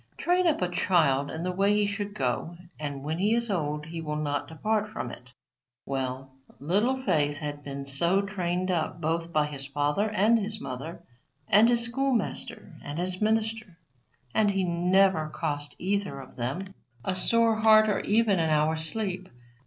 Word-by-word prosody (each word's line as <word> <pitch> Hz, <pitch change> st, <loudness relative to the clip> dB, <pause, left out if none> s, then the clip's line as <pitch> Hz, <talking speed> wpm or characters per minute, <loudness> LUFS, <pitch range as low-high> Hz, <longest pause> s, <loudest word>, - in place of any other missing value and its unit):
"Train 360 Hz, +1 st, +2 dB
up 300 Hz, -, +1 dB
a -, -, +2 dB
child 155 Hz, -7 st, +2 dB
in 160 Hz, -, -5 dB
the 180 Hz, -, -1 dB
way 200 Hz, +3 st, +2 dB
he 210 Hz, 0 st, +2 dB
should 205 Hz, 0 st, -4 dB
go, 135 Hz, +6 st, -2 dB, 0.2 s
and 145 Hz, -2 st, -5 dB
when 155 Hz, +3 st, -3 dB
he 210 Hz, +4 st, +3 dB
is 235 Hz, -2 st, 0 dB
old 150 Hz, -4 st, -2 dB
he 165 Hz, +1 st, -6 dB
will 150 Hz, -1 st, -3 dB
not 145 Hz, -1 st, -2 dB
depart 215 Hz, +6 st, -1 dB
from 130 Hz, -, -5 dB
it." 125 Hz, +1 st, -12 dB, 0.5 s
Well, 135 Hz, 0 st, -3 dB, 0.3 s
Little 215 Hz, -, +1 dB
Faith 150 Hz, -, +1 dB
had 145 Hz, -1 st, -5 dB
been 140 Hz, -1 st, -6 dB
so 170 Hz, +8 st, +4 dB
trained 185 Hz, -2 st, -2 dB
up 165 Hz, -1 st, -1 dB
both 165 Hz, +1 st, -2 dB
by 155 Hz, -2 st, +2 dB
his 140 Hz, -2 st, -5 dB
father 145 Hz, +9 st, 0 dB
and 215 Hz, +3 st, +3 dB
his 215 Hz, +1 st, -1 dB
mother 155 Hz, +5 st, -7 dB, 0.4 s
and 220 Hz, +3 st, +6 dB
his 240 Hz, -1 st, +3 dB
schoolmaster 245 Hz, -1 st, -2 dB
and 145 Hz, +1 st, -6 dB
his 180 Hz, +2 st, -3 dB
minister, 220 Hz, -3 st, -1 dB, 0.6 s
and 215 Hz, -1 st, +3 dB
he 195 Hz, -1 st, 0 dB
never 180 Hz, -1 st, +2 dB
cost 145 Hz, -2 st, -4 dB
either 195 Hz, -6 st, -2 dB
of 130 Hz, -, -12 dB
them 145 Hz, +11 st, -4 dB, 0.3 s
a 185 Hz, -, 0 dB
sore 230 Hz, +3 st, +3 dB
heart 215 Hz, 0 st, +6 dB
or 210 Hz, -, +1 dB
even 210 Hz, -3 st, +2 dB
an 160 Hz, -1 st, +1 dB
hour's 155 Hz, +1 st, +1 dB
sleep. 185 Hz, +1 st, -3 dB
180 Hz, 175 wpm, -27 LUFS, 150-210 Hz, 0.6 s, and